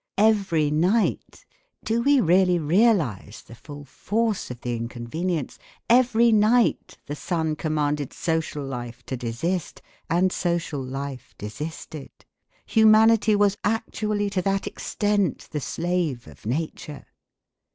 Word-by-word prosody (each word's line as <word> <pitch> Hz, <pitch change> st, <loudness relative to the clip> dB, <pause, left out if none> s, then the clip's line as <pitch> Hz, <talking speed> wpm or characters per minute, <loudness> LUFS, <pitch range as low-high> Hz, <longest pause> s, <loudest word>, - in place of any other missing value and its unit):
Every 195 Hz, -8 st, +2 dB
night, 180 Hz, +9 st, 0 dB, 0.4 s
do 230 Hz, +1 st, 0 dB
we 280 Hz, +2 st, +4 dB
really 180 Hz, -2 st, +4 dB
realise 160 Hz, -, +1 dB
the -, -, -14 dB
full 145 Hz, +4 st, -11 dB
force 210 Hz, -, -2 dB
of 125 Hz, -1 st, -8 dB
the 120 Hz, -1 st, -2 dB
inconvenience? 125 Hz, +8 st, -4 dB, 0.3 s
every 235 Hz, -1 st, +5 dB
night 220 Hz, +3 st, +2 dB
the 145 Hz, -, -5 dB
sun 160 Hz, -1 st, -2 dB
commanded 150 Hz, -2 st, -1 dB
social 160 Hz, -3 st, -2 dB
life 125 Hz, -2 st, -7 dB
to 130 Hz, -, -4 dB
desist 130 Hz, +9 st, -3 dB, 0.3 s
and 180 Hz, +3 st, +2 dB
social 170 Hz, -5 st, -2 dB
life 135 Hz, 0 st, -7 dB
desisted. 150 Hz, +6 st, -7 dB, 0.6 s
Humanity 220 Hz, -1 st, +5 dB
was 205 Hz, -1 st, +2 dB
actually 210 Hz, -1 st, -1 dB
to 185 Hz, -1 st, 0 dB
that 195 Hz, +1 st, -1 dB
extent 205 Hz, -2 st, -1 dB
the 150 Hz, -, -2 dB
slave 165 Hz, -7 st, -2 dB
of 75 Hz, +6 st, -13 dB
nature! 150 Hz, +2 st, -4 dB
170 Hz, 120 wpm, -24 LUFS, 140-205 Hz, 0.6 s, every